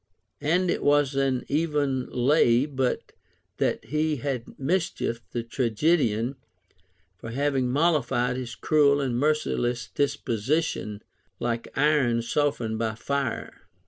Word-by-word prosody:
And 175 Hz, +5 st, +2 dB
it -, -, -1 dB
was 145 Hz, -1 st, +3 dB
an 135 Hz, -2 st, 0 dB
even 145 Hz, -4 st, 0 dB
lav 130 Hz, +1 st, +3 dB
but 130 Hz, -1 st, -1 dB, 0.5 s
that -, -, 0 dB
he 155 Hz, +1 st, 0 dB
had 130 Hz, -3 st, -3 dB
mischiefed 145 Hz, -6 st, -1 dB
the 120 Hz, -, -2 dB
trae^edian 120 Hz, 0 st, +1 dB, 0.8 s
for 115 Hz, -, -7 dB
having 135 Hz, 0 st, 0 dB
mollified 140 Hz, -5 st, +2 dB
his 125 Hz, -2 st, -5 dB
cruel 145 Hz, +1 st, +3 dB
and 130 Hz, -4 st, -1 dB
merciless 125 Hz, -4 st, 0 dB
disposition, 135 Hz, -4 st, -1 dB, 0.4 s
like 120 Hz, -1 st, -2 dB
iron 135 Hz, -5 st, +3 dB
softened 120 Hz, -4 st, 0 dB
by 110 Hz, -1 st, -1 dB
fire. 135 Hz, -7 st, -3 dB
135 Hz, 110 wpm, -26 LUFS, 120-150 Hz, 0.8 s, was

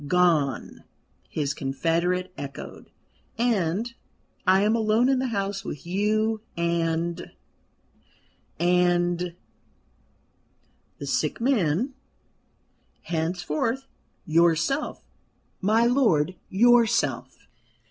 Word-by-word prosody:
"Gone!" 165 Hz, -6 st, +1 dB, 0.5 s
his 140 Hz, -2 st, -2 dB
confederate 170 Hz, +7 st, -1 dB
echoed: 140 Hz, -4 st, -8 dB, 0.5 s
"and 225 Hz, -1 st, 0 dB, 0.5 s
I 190 Hz, +1 st, +5 dB
am 215 Hz, +2 st, +3 dB
alone 225 Hz, +2 st, +2 dB
in 265 Hz, -1 st, +2 dB
the 260 Hz, -, 0 dB
house 200 Hz, -3 st, -2 dB
with 145 Hz, -, -7 dB
you 215 Hz, +4 st, 0 dB, 0.2 s
and 170 Hz, 0 st, -1 dB, 1.3 s
and 175 Hz, 0 st, +2 dB, 0.9 s
" -, -, -41 dB
"The -, -, -6 dB
sick -, -, -1 dB
man 230 Hz, -, +1 dB, 1.1 s
henceforth, 175 Hz, -, -2 dB, 0.4 s
yourself, 170 Hz, -, +1 dB, 0.6 s
my 220 Hz, +4 st, +3 dB
lord, 220 Hz, -, +3 dB, 0.2 s
yourself." 235 Hz, +2 st, +3 dB
180 Hz, 80 wpm, -25 LUFS, 170-225 Hz, 1.3 s, I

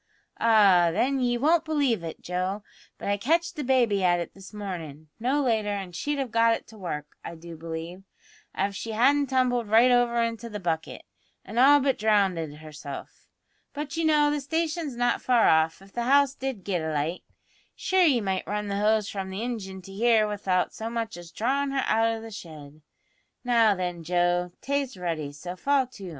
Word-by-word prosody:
Ah, 200 Hz, -6 st, +5 dB
then, 255 Hz, +9 st, +1 dB
ye 245 Hz, -1 st, +1 dB
won't 315 Hz, +6 st, +3 dB
believe 285 Hz, -, 0 dB
it, 165 Hz, -, -7 dB
Joe, 185 Hz, +3 st, -2 dB, 0.3 s
but -, -, -7 dB
I 200 Hz, 0 st, +1 dB
catched 330 Hz, -, 0 dB
the 300 Hz, -, -4 dB
baby 240 Hz, -7 st, +2 dB
at 175 Hz, -1 st, +3 dB
it 170 Hz, -, -5 dB
this 195 Hz, -1 st, -13 dB
mornin', 165 Hz, -8 st, -7 dB
no 270 Hz, +5 st, +1 dB
later, 220 Hz, -4 st, +1 dB
an' 195 Hz, -3 st, -4 dB
she'd 290 Hz, +12 st, -3 dB
have 265 Hz, -4 st, -3 dB
got 230 Hz, 0 st, +4 dB
it -, -, -9 dB
to 220 Hz, -, -14 dB
work, 150 Hz, -5 st, -6 dB
I 170 Hz, -, -7 dB
do 165 Hz, +1 st, -10 dB
believe, 165 Hz, +3 st, -7 dB, 0.6 s
av 200 Hz, +1 st, -1 dB
she 225 Hz, +2 st, -5 dB
hadn't 275 Hz, +5 st, +3 dB
tumbled 250 Hz, -3 st, +1 dB
right 230 Hz, +4 st, +5 dB
over 240 Hz, -1 st, +3 dB
into 230 Hz, 0 st, -4 dB
the 210 Hz, -1 st, -6 dB
bucket, 165 Hz, -3 st, -3 dB, 0.4 s
an' 220 Hz, +5 st, -3 dB
all 285 Hz, +3 st, +7 dB
but 270 Hz, -1 st, +1 dB
drownded 195 Hz, -7 st, +2 dB
herself. 150 Hz, -2 st, -10 dB, 0.5 s
But, 295 Hz, +1 st, -5 dB
you 330 Hz, -, -1 dB
know, 300 Hz, -2 st, +4 dB
the 295 Hz, -1 st, -1 dB
station's 320 Hz, -1 st, -2 dB
not 245 Hz, 0 st, +1 dB
far 245 Hz, -3 st, +3 dB
off, 160 Hz, +3 st, +2 dB
if 195 Hz, -, -18 dB
the 240 Hz, -, -2 dB
house 280 Hz, +1 st, +4 dB
did 265 Hz, -8 st, -5 dB
git 180 Hz, -3 st, -1 dB
alight. 160 Hz, +2 st, -2 dB, 0.5 s
Shure 375 Hz, 0 st, +1 dB
ye 285 Hz, -9 st, +4 dB
might 190 Hz, -2 st, -2 dB
run 210 Hz, 0 st, -3 dB
the 200 Hz, 0 st, -1 dB
hose 215 Hz, 0 st, +2 dB
from 195 Hz, -2 st, -5 dB
the 190 Hz, +2 st, -5 dB
ingin 195 Hz, -6 st, -5 dB
to 195 Hz, -, -11 dB
here 220 Hz, 0 st, +3 dB
without 195 Hz, -3 st, -1 dB
so 225 Hz, +1 st, -5 dB
much 230 Hz, -1 st, -3 dB
as 175 Hz, -1 st, -10 dB
drawin' 275 Hz, +9 st, 0 dB
her 270 Hz, -1 st, -1 dB
out 225 Hz, +1 st, +2 dB
o' 225 Hz, 0 st, -1 dB
the 225 Hz, 0 st, -9 dB
shed. 155 Hz, -6 st, -11 dB, 0.6 s
Now, 230 Hz, -4 st, +4 dB
then, 180 Hz, -2 st, -4 dB
Joe, 175 Hz, +1 st, +1 dB
tay's 275 Hz, -5 st, -2 dB
ready, 165 Hz, -5 st, -3 dB
so 175 Hz, +5 st, -7 dB
fall 275 Hz, +7 st, +2 dB
to." 200 Hz, -7 st, -10 dB
215 Hz, 195 wpm, -26 LUFS, 180-255 Hz, 0.6 s, all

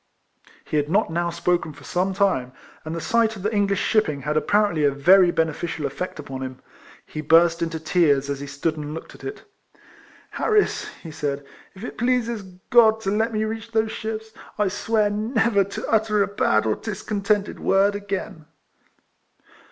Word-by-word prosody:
He 155 Hz, -, -1 dB
had 145 Hz, 0 st, 0 dB
not 195 Hz, 0 st, +2 dB
now 170 Hz, +1 st, 0 dB
spoken 170 Hz, -1 st, -1 dB
for 145 Hz, 0 st, -15 dB
some 185 Hz, +4 st, -1 dB
time, 180 Hz, -11 st, +1 dB, 0.3 s
and 155 Hz, +1 st, -5 dB
the -, -, -3 dB
sight 225 Hz, +4 st, +1 dB
of 195 Hz, -, -9 dB
the 210 Hz, +2 st, -1 dB
English 200 Hz, -2 st, +1 dB
shipping 155 Hz, -10 st, +1 dB
had 150 Hz, +2 st, -1 dB
apparently 200 Hz, -1 st, +2 dB
a 145 Hz, -, +5 dB
very 175 Hz, +7 st, +5 dB
beneficial 160 Hz, -1 st, -1 dB
effect 180 Hz, +6 st, -4 dB
upon 135 Hz, -3 st, -7 dB
him. 130 Hz, -1 st, -6 dB, 0.5 s
He 155 Hz, -, -6 dB
burst 165 Hz, +2 st, +4 dB
into 165 Hz, -1 st, -2 dB
tears 155 Hz, -4 st, +2 dB
as 140 Hz, -1 st, -3 dB
he 140 Hz, -, -6 dB
stood 155 Hz, +3 st, -2 dB
and 150 Hz, 0 st, -5 dB
looked 165 Hz, -, -9 dB
at -, -, -15 dB
it. 405 Hz, -, -6 dB, 0.5 s
" -, -, -25 dB
Harris," 430 Hz, -1 st, +2 dB, 0.2 s
he 165 Hz, -, -8 dB
said, 145 Hz, -2 st, -3 dB, 0.3 s
"if 190 Hz, -, -11 dB
it 245 Hz, -, -7 dB
pleases 235 Hz, -2 st, 0 dB, 0.3 s
God 225 Hz, -2 st, +6 dB
to 195 Hz, -, -1 dB
let 220 Hz, +3 st, +1 dB
me 215 Hz, -1 st, -1 dB
reach 225 Hz, +1 st, -5 dB
those 220 Hz, 0 st, +1 dB
ships, 220 Hz, 0 st, -5 dB, 0.3 s
I 210 Hz, -2 st, +2 dB
swear 210 Hz, +1 st, +1 dB
never 220 Hz, -1 st, +2 dB
to 200 Hz, -, -6 dB
utter 215 Hz, -2 st, +2 dB
a -, -, -1 dB
bad 110 Hz, -, +1 dB
or 110 Hz, -, +2 dB
discontented 205 Hz, -1 st, -2 dB
word 195 Hz, +1 st, +3 dB
again." 195 Hz, -6 st, -5 dB
195 Hz, 180 wpm, -23 LUFS, 155-215 Hz, 0.5 s, God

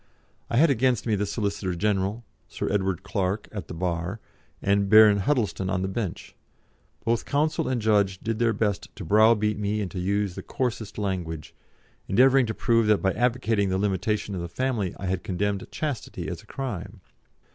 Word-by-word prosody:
I 115 Hz, -, 0 dB
had 155 Hz, +2 st, +6 dB
against 125 Hz, -2 st, +1 dB
me 115 Hz, -, +1 dB
the 105 Hz, 0 st, 0 dB
Solicitor 100 Hz, -3 st, -2 dB
General, 100 Hz, +4 st, 0 dB, 0.2 s
Sir -, -, -4 dB
Edward 95 Hz, -3 st, 0 dB
Clarke, 100 Hz, 0 st, -2 dB
at 105 Hz, -3 st, -6 dB
the -, -, -7 dB
bar, 90 Hz, +3 st, -2 dB, 0.4 s
and 100 Hz, 0 st, +1 dB
Baron 110 Hz, -1 st, +8 dB
Huddleston 105 Hz, -5 st, 0 dB
on 95 Hz, -1 st, 0 dB
the -, -, 0 dB
bench; 95 Hz, -1 st, -4 dB, 0.7 s
both 115 Hz, 0 st, +1 dB
counsel 155 Hz, +2 st, 0 dB
and 130 Hz, -2 st, 0 dB
judge 100 Hz, -3 st, +2 dB
did 115 Hz, +2 st, -3 dB
their 120 Hz, -1 st, +3 dB
best 105 Hz, -3 st, -1 dB
to -, -, -7 dB
browbeat 105 Hz, +2 st, +4 dB
me 105 Hz, +1 st, -1 dB
and 100 Hz, -4 st, -3 dB
to 95 Hz, -, -5 dB
use 100 Hz, +1 st, 0 dB
the -, -, -7 dB
coarsest 115 Hz, -5 st, -3 dB
language, 85 Hz, -6 st, -3 dB, 0.5 s
endeavouring 130 Hz, +4 st, +5 dB
to 110 Hz, -, -3 dB
prove 115 Hz, -3 st, +2 dB
that 105 Hz, -1 st, +3 dB
by 95 Hz, -, +3 dB
advocating 115 Hz, -4 st, +1 dB
the 95 Hz, -, 0 dB
limitation 105 Hz, +1 st, -1 dB
of 90 Hz, -, -3 dB
the 85 Hz, -, -5 dB
family 115 Hz, -3 st, -1 dB
I -, -, -6 dB
had 95 Hz, -1 st, -1 dB
condemned 100 Hz, +1 st, -2 dB
chastity 145 Hz, -7 st, -4 dB
as -, -, -6 dB
a -, -, -22 dB
crime. 105 Hz, -7 st, -5 dB
105 Hz, 180 wpm, -26 LUFS, 95-115 Hz, 0.7 s, Baron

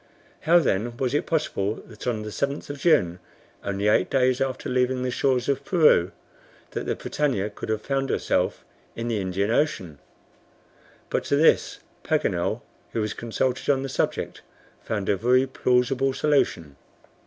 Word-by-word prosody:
"How 175 Hz, -, +8 dB
then 120 Hz, -, 0 dB
was 130 Hz, 0 st, -1 dB
it 145 Hz, -, 0 dB
possible 110 Hz, -10 st, 0 dB
that 110 Hz, +1 st, -11 dB
on 110 Hz, -3 st, -1 dB
the 105 Hz, -, -6 dB
7th 140 Hz, +5 st, -3 dB
of 145 Hz, -, -8 dB
June, 90 Hz, -, +3 dB, 0.4 s
only 100 Hz, +1 st, -1 dB
eight 105 Hz, -3 st, +3 dB
days 130 Hz, -1 st, +2 dB
after 130 Hz, -1 st, -2 dB
leaving 125 Hz, 0 st, +1 dB
the 125 Hz, -, -1 dB
shores 130 Hz, -1 st, +1 dB
of 140 Hz, 0 st, 0 dB
Peru, 150 Hz, -, +4 dB, 0.6 s
that -, -, -4 dB
the -, -, 0 dB
BRITANNIA 115 Hz, -9 st, -1 dB
could 105 Hz, -, -8 dB
have 110 Hz, -1 st, -1 dB
found 135 Hz, -1 st, -1 dB
herself -, -, 0 dB, 0.3 s
in 115 Hz, +1 st, -3 dB
the 110 Hz, -3 st, 0 dB
Indian 95 Hz, +3 st, -1 dB
Ocean?" 95 Hz, -, 0 dB, 1.1 s
But -, -, 0 dB
to -, -, +1 dB
this, 155 Hz, +3 st, +3 dB, 0.2 s
Paganel, -, -, 0 dB, 0.3 s
who 115 Hz, -, 0 dB
was 105 Hz, 0 st, -2 dB
consulted 120 Hz, +3 st, -2 dB
on 135 Hz, -1 st, +3 dB
the 135 Hz, -, -4 dB
subject, -, -, -2 dB, 0.4 s
found 105 Hz, -3 st, -3 dB
a -, -, +3 dB
very 125 Hz, +6 st, +3 dB
plausible 130 Hz, +1 st, +1 dB
solution. 90 Hz, -, 0 dB
125 Hz, 160 wpm, -25 LUFS, 105-135 Hz, 1.1 s, How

